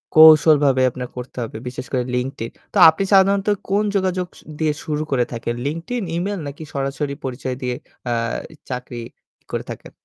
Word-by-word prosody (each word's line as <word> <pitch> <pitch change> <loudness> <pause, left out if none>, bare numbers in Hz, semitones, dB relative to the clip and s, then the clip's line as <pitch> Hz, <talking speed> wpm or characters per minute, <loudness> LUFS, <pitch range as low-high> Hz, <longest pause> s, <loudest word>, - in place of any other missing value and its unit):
কৌশলভাবে 155 -4 +7
আপনার 125 0 -5
করতে 125 +1 -7
হবে। 110 - -6
বিশেষ 125 +1 -5
করে 125 -2 +1
LinkedIn. 125 -2 -3 0.2
তো - - -1
আপনি 160 +5 0
সাধারণত 195 +1 +5 0.2
কোন 205 +2 +2
যোগাযোগ 185 -2 0 0.3
দিয়ে 155 -1 +2
শুরু 150 -1 -2
করে 125 -3 +2
থাকেন 120 0 -3
LinkedIn, 165 +10 -3
ইমেইল 200 +2 -2
নাকি 145 +3 -7
সরাসরি 140 +1 -2
পরিচয় 130 0 -3
দিয়ে 125 -1 -1 0.4
আ - - +2 0.6
চাকরি 125 -1 -5 0.5
করে - - -2
থাকেন? - - -9
140 Hz, 155 wpm, -21 LUFS, 125-175 Hz, 0.6 s, কৌশলভাবে